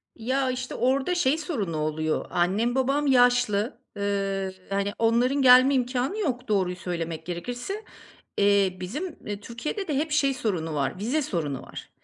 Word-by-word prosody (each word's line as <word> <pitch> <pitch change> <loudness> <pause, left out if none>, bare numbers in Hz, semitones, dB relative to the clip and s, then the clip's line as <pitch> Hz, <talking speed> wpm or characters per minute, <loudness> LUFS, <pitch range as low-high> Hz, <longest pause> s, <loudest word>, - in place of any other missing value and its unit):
Ya, 260 +3 0
işte 255 0 -5
orada 270 +7 +1
şey 300 -3 +2
sorunu 225 - -3
oluyor. 155 +1 -1
Annem 205 +8 +1
babam 275 +3 +1
yaşlı. 245 -4 +3
Iıı, 195 -1 -1 0.2
hani, 200 +1 -1
onların 245 +5 +2
gelme 255 +2 +7
imkânı 255 - 0
yok 255 - -2
doğruyu 190 -4 +1
söylemek 170 -3 -4
gerekirse. 245 - -5 0.5
Eee, 200 -2 +3
bizim, 295 - -5
iii, 205 -1 -4
Türkiye'de 300 - -5
de 295 - -1
hep 305 +2 -1
şey 275 -3 +2
sorunu 175 -10 -2
var, 140 +6 -1
vize 260 +9 0
sorunu 155 - -3
var. - - -10
235 Hz, 150 wpm, -26 LUFS, 190-270 Hz, 0.5 s, gelme